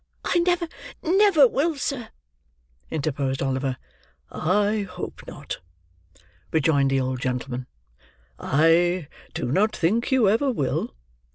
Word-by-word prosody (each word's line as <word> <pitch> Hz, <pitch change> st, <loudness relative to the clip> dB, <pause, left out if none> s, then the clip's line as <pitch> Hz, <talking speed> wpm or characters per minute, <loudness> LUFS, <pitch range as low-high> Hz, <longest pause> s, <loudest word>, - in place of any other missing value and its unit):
"I 350 Hz, -, +2 dB
never, 350 Hz, 0 st, +1 dB, 0.4 s
never 360 Hz, -5 st, +5 dB
will, 305 Hz, +6 st, 0 dB
sir," 270 Hz, -4 st, -3 dB, 0.8 s
interposed 140 Hz, -3 st, -2 dB
Oliver. 135 Hz, -1 st, -1 dB, 0.5 s
"I 205 Hz, +5 st, +1 dB
hope 180 Hz, -1 st, -7 dB
not," -, -, -7 dB, 0.9 s
rejoined 145 Hz, -3 st, +3 dB
the 135 Hz, 0 st, +2 dB
old 130 Hz, 0 st, -2 dB
gentleman. 125 Hz, 0 st, -3 dB, 0.7 s
"I 165 Hz, +2 st, +3 dB, 0.3 s
do 120 Hz, -, -2 dB
not 210 Hz, +8 st, +2 dB
think 220 Hz, +10 st, +1 dB
you 255 Hz, -5 st, +4 dB
ever 230 Hz, +8 st, +3 dB
will. 140 Hz, -, -2 dB
175 Hz, 110 wpm, -24 LUFS, -, 0.9 s, never